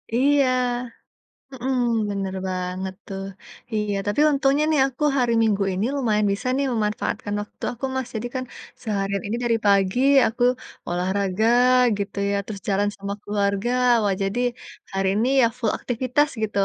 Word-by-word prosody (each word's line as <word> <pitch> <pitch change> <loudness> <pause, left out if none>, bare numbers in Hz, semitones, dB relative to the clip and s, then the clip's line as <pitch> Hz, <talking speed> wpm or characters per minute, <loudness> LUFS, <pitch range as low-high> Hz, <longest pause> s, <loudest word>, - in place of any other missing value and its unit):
Iya, 280 +2 +4 1.0
hmm, 260 0 -2 0.3
benar 195 -1 -3
banget 185 +1 -3
tuh. 195 -2 -5 0.5
Iya, 210 -1 0
tapi 205 +8 +1
untungnya 275 +1 +2
nih 305 - +3
aku 270 +2 -5
hari 245 -2 +2
Minggu 210 -3 +2
ini 190 +4 -1
lumayan 215 -6 +1
bisa 225 +6 -4
nih 280 +1 +1
memanfaatkan 210 -1 -2
waktu 210 - -12
aku, 245 +2 -5
Mas. 260 -2 -2
Jadi 220 +2 -2
kan, 260 - -1 0.4
seharian 200 -3 -2
ini 225 +3 -2
dari 235 -1 +2
pagi 200 +2 +3 0.3
aku 235 +2 -2 0.5
olahraga 190 +4 0 0.5
gitu 200 0 -5
ya, - - +1
terus 200 -2 -7
jalan 205 +1 +2
sama 200 0 -4
keluarga. 200 +2 0 0.3
Wah 200 -1 +2
jadi, 195 +5 -1 0.5
hari 195 0 0
ini 225 +4 +1
ya - - +6
full 225 -4 +1
aktivitas 255 +4 +1
gitu. 215 -2 -2
210 Hz, 150 wpm, -23 LUFS, 195-245 Hz, 1.0 s, ya